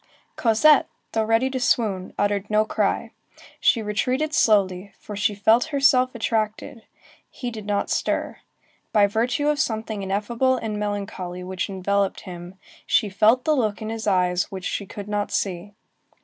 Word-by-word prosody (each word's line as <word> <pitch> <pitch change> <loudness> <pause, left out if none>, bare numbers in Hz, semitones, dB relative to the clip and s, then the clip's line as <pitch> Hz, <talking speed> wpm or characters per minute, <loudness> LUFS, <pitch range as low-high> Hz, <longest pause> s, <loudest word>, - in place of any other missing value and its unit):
Cosette, 260 +6 +4 0.2
though 225 - +1
ready 225 +4 +2
to 260 - -2
swoon, 210 -6 0
uttered 205 0 0
no 215 0 +3
cry. - - -1 0.5
She 230 - +3
retreated 255 +8 -1
slowly, 200 -6 +2
for 210 - -8
she 205 +1 0
felt 220 +5 +4
herself 275 -4 +3
attracted. 220 0 -2 0.5
He 245 -2 -6
did 215 -3 -8
not 205 -1 -1
stir. - - -1 0.6
By 210 -2 +5
virtue 245 +8 0
of 300 -1 +1
something 220 -4 -2
ineffable 230 +7 0
and 215 -3 -4
melancholy 195 -3 -4
which 185 +1 -4
enveloped 195 +1 -1
him, 175 0 -9 0.3
she 215 - +2
felt 220 +6 +3
the 310 - +3
look 215 -6 0
in 220 - -5
his 225 -1 -5
eyes 180 -1 +1
which 190 -2 -6
she 200 - -3
could 205 0 -8
not 205 0 -2
see. 195 +1 -3
210 Hz, 155 wpm, -23 LUFS, 200-235 Hz, 0.6 s, By